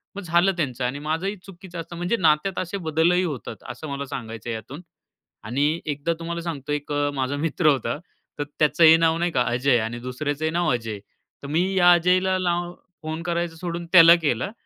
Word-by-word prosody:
मग 200 - -5
झालं 175 +2 +3
त्यांचं 130 -6 -2
आणि 135 +4 -3
माझंही 165 +7 -2
चुकीचं 180 -2 -10
असतं 165 +1 -8
म्हणजे 175 +7 0
नात्यात 165 +2 +2
असे 185 +2 -3
बदलही 170 +4 +3
होतात, 145 - -5
असं 125 +6 -7
मला 140 0 -4
सांगायचं 115 -3 -7
आहे 115 - -2
यातून. 135 +9 -9 0.6
आणि 145 +8 0
एकदा 150 +2 -1
तुम्हाला 170 0 -4
सांगतो 150 -4 -5
एक 150 0 -3
अ, 145 0 +1
माझा 135 +1 -1
मित्र 165 +2 0
होता. 135 -4 +1 0.4
तर 145 - +1 0.2
त्याचं 155 +2 +3
हे 160 0 +9
नाव 165 0 +2
नाही 175 +1 0
का 130 - +1
अजय 125 +1 +2
आणि 115 +2 -4
दुसऱ्याचंही 145 +5 -3
नाव 170 -2 +1
अजय. 115 -4 -3 0.4
तर - - -6
मी 160 +5 +1
या 175 -1 +7
अजयला 185 +2 +2
लाव 175 -1 -1 0.3
फोन 160 +1 -5
करायचं 170 -1 -2
सोडून 170 0 -5
त्याला 170 -2 +9
केलं 145 - -1
160 Hz, 190 wpm, -23 LUFS, 140-175 Hz, 0.6 s, हे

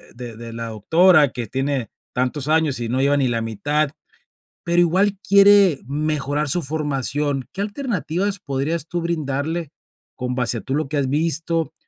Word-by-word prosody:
de 120 -2 -8
de 115 0 -8
la 115 0 -5
doctora 155 - +4
que 120 - -4
tiene 135 -1 -2 0.2
tantos 130 +3 -1
años 155 -4 +2
y 115 -1 -3
no 130 +2 0
lleva 140 +1 +3
ni 135 -2 +2
la 115 -2 -1
mitad, 145 +7 -1 0.7
pero 170 0 +1
igual 190 +4 +2
quiere 200 -5 +6
mejorar 150 0 -1
su 175 +5 0
formación. 145 -2 -2
¿Qué - - -10
alternativas 205 - -2
podrías 150 +1 -2
tú 175 -1 -3
brindarle 160 -1 -2 0.4
con 125 -1 -3
base 125 -2 0
a - - -10
tú 135 +5 -3
lo 150 -2 -1
que 150 - -3
has 135 -2 0
visto 160 +1 -1
150 Hz, 165 wpm, -21 LUFS, 130-170 Hz, 0.7 s, quiere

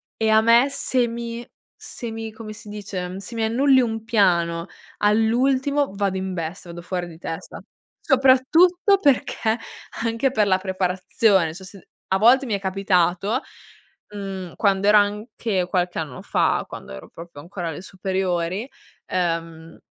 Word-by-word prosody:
e 220 -1 0
a 220 0 +6
me 235 +3 +5
se 260 -3 0
mi 235 0 -6 0.3
se 235 -3 -8
mi 225 0 -6
come 215 -1 -9
si 215 0 -12
dice? 190 -3 -5
Se 200 +4 -8
mi 225 - -1
annulli 260 +4 +4
un 225 -2 -3
piano 170 -6 +2 0.3
all'ultimo 255 +5 +2
vado 200 -1 0
in 190 0 -3
bestia, 170 +1 -5
vado 175 0 -8
fuori 175 0 -4
di 165 -2 -12
testa 165 -1 -7 0.4
soprattutto 315 +9 +4
perché 250 - +1 0.5
anche 230 +3 0
per 215 -6 +2
la 185 -1 +4
preparazione. 185 -1 +1
Cioè 190 +3 -10
se 195 -1 -14 0.2
a 190 - +2
volte 245 +6 +5
mi 230 - -2
è 200 - 0
capitato, 190 +3 +1 0.7
mhmm, 190 -3 -6
quando 200 -1 +1
ero 210 0 +7
anche 205 -2 0
qualche 180 -1 -1
anno 145 -6 -6
fa, - - +1
quando 65 - -9
ero 65 - -10
proprio 165 -3 -11
ancora 175 +2 -6
alle 160 - -6
superiori 185 +2 -2 0.4
ehm, 165 -2 -3
200 Hz, 150 wpm, -22 LUFS, 180-230 Hz, 0.7 s, ero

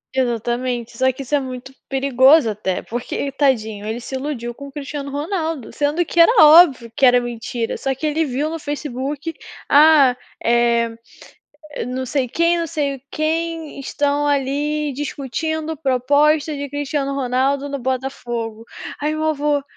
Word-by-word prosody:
Exatamente, 240 -1 -1
só 260 +2 +2
que 270 +2 -8
isso 265 - -9
é 290 - +4
muito 260 0 -7 0.2
perigoso, 270 +1 +4
até 205 -3 -2
porque 240 +2 -5
ele 280 - -2
tadinho, 220 -7 0
ele 225 +2 -3
se 245 - -9
iludiu 260 -3 -4
com 280 +3 -10
o 275 - -11
Cristiano 280 0 -6
Ronaldo, 315 - -3
sendo 295 +4 0
que 340 - -2
era 335 +7 +8
óbvio 300 -7 +6
que - - -4
era 250 -1 +7
mentira. 235 -1 -4
Só 270 -1 -1
que 310 - -5
ele 310 +2 +1
viu 285 +2 -2
no 330 - -4
Facebook. 290 +2 -4 0.3
"Ah, 290 -3 +6 0.3
é, 235 -1 +2 0.9
não 260 +1 -3
sei 260 0 -1
quem, 335 +6 +2
não 335 - -2
sei 280 -4 -2
quem 325 0 -2
estão 285 +1 0
ali 290 +1 0
discutindo 310 +3 -3
proposta 290 +3 +2
de 285 -1 -5
Cristiano 285 -1 -2
Ronaldo 270 +2 0
no 280 - -4
Botafogo", 240 -3 -4 0.4
aí 305 +1 0
meu 310 0 -2
avô 290 -1 0
275 Hz, 155 wpm, -20 LUFS, 250-300 Hz, 0.9 s, era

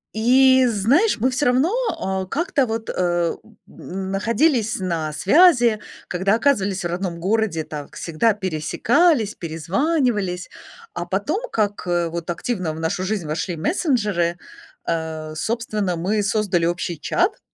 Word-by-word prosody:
И 260 +3 +5
знаешь, 240 - +2
мы 255 +4 +2
все 260 +3 -1
равно, 260 +9 +3 0.3
а, 190 0 -2
как-то 295 - 0
вот, 225 0 -4
эм, 175 -2 0 0.3
находились 215 - -1
на 165 -4 -2
связи, 240 - +5 0.3
когда 190 +3 0
оказывались 205 -7 +1
в - - 0
родном 175 -1 -3
городе, 195 -4 0
так 150 -2 -8
всегда 180 +7 +1
пересекались, 210 - +1
перезванивались. 190 - -1 0.4
А - - -4
потом, - - -2
как, 205 -3 -1
э, 175 -1 0
вот 170 0 -5
активно 180 -4 -3
в 160 - -8
нашу 165 +3 -2
жизнь 190 -5 -2
вошли 170 +3 -3
мессенджеры, 205 - 0 0.5
э, 160 -1 -3
собственно, 215 -2 -2
мы 205 +5 0
создали 195 -5 +1
общий 175 -2 -2
чат 370 - 0
195 Hz, 130 wpm, -21 LUFS, 170-240 Hz, 0.5 s, И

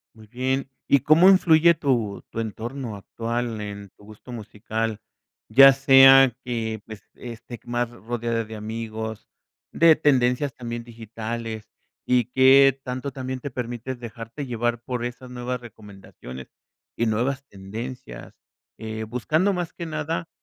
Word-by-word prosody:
Muy 110 -1 -15
bien, 130 +3 -2 0.2
¿y 140 - +5
cómo 165 +7 +6
influye 170 -3 +6
tu 120 -9 -1
tu - - -5
entorno 115 +2 -5
actual 115 +2 -4
en 100 -1 -7
tu - - -19
gusto 110 +4 -13
musical?, 110 -1 -4 0.5
ya 135 +1 +9
sea 135 -1 +7
que, 110 -3 -3
pues, 110 -2 -10
esté 120 0 -9
más 120 0 -1
rodeada 115 0 -3
de 110 0 -9
amigos, 110 0 -6 0.4
de 165 -1 +6
tendencias 135 -2 +2
también 120 -1 -6
digitales, 115 -1 -7 0.4
¿y 125 -2 +2
que 135 +1 +6
tanto 130 +2 -4
también 130 0 -5
te 140 - -6
permites 120 +1 -5
dejarte 115 +4 -7
llevar 120 -1 -2
por 120 0 -4
esas 125 +1 -7
nuevas 125 0 -4
recomendaciones 100 - -12 0.5
y 115 - +1
nuevas 125 +5 -1
tendencias?, 100 - -8 0.5
eh, 110 0 -5
buscando 155 - 0
más 175 -2 -4
que 170 - -6
nada, 160 +1 -3
120 Hz, 135 wpm, -24 LUFS, 110-135 Hz, 0.5 s, ya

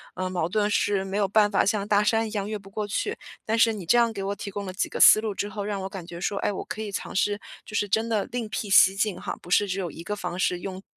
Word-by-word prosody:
呃， 185 - -2
矛 175 -2 -1
盾 210 +1 +1
是 200 -2 +1
没 195 +1 -3
有 205 - +2
办 205 +1 +3
法， 195 - +3
像 205 0 0
大 210 0 +3
山 225 +1 +2
一 215 - -8
样 205 -1 -3
越 215 - -2
不 195 -1 -14
过 210 0 -3
去， 415 - -2 0.3
但 225 +1 0
是 225 -1 +5
你 195 -5 -7
这 240 - +4
样 230 -1 +3
给 200 -3 -5
我 200 +1 -2
提 200 - -6
供 200 0 -5
了 185 - -6
几 190 - -1
个 - - -5
思 215 - +8
路 215 -3 -3
之 205 - -2
后， 205 0 -5
让 200 -1 -3
我 - - -3
感 190 -3 -8
觉 170 -1 -8
说， 200 +2 -2
哎， - - 0
我 195 - -5
可 220 - -5
以 210 -2 -5
尝 - - -5
试， 205 +1 +1 0.2
就 215 - -9
是 205 - +1
真 220 +3 0
的 215 -3 0
另 235 -3 -3
辟 210 -1 -4
蹊 190 0 +7
径 200 -1 -1
哈， - - -4
不 175 - -12
是 205 +2 +4
只 185 - -2
有 175 -4 -3
一 - - -10
个 210 - -3
方 185 -3 -5
式， 180 -1 +1
用 190 -1 -5
讲 - - -43
205 Hz, 345 characters per minute, -26 LUFS, 195-215 Hz, 0.3 s, 思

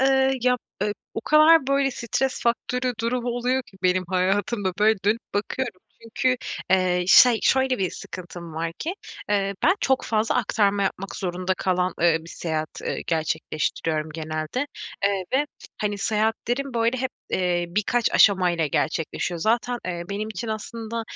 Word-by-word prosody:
eee, 265 0 +3
ya, 250 0 +4 0.3
eee, 210 0 +1 0.2
o - - -2
kadar 305 +2 +6
böyle 275 0 +2
stres 255 +2 -2
faktörü 250 +1 0
durum 240 +1 -1
oluyor 245 +2 0
ki 195 - -19
benim 185 0 +2
hayatımda 190 +2 0
böyle 215 0 +4
dönüp 215 +3 +2
bakıyorum. 215 0 -2 0.2
Çünkü, 255 +3 0 0.3
eee, 180 -1 +3
şey, 240 +3 +8
şöyle 265 -1 +3
bir 190 -2 0
sıkıntım 175 -2 -9
var 165 +1 -2
ki, 335 +4 -3 0.3
eee, 200 -1 +1
ben 365 +4 +5
çok 265 -1 +1
fazla 220 0 +1
aktarma 205 -2 +2
yapmak 195 0 -3
zorunda 185 0 -2
kalan, 185 -1 0
ııı, 165 -1 +3
bir - - -12
seyahat, 155 -2 -4
ııı, - - -2
gerçekleştiriyorum 155 0 -1
genelde. 155 - -3 0.4
Eee, 200 -2 +1
ve 285 +3 +3 0.3
hani 205 -1 -1
seyahatlerim 225 +5 -1
böyle 230 +2 +1
hep, 260 +1 -1 0.2
ııı, 180 -1 +1
birkaç 230 +3 +1
aşama 190 -3 +5
ile 165 -3 0
gerçekleşiyor. 165 +3 -1
Zaten, 240 +4 +1
eee, 175 -1 -3
benim 210 +2 -3
için 220 +2 -5
aslında, 225 +1 -4
210 Hz, 155 wpm, -24 LUFS, 180-245 Hz, 0.4 s, şey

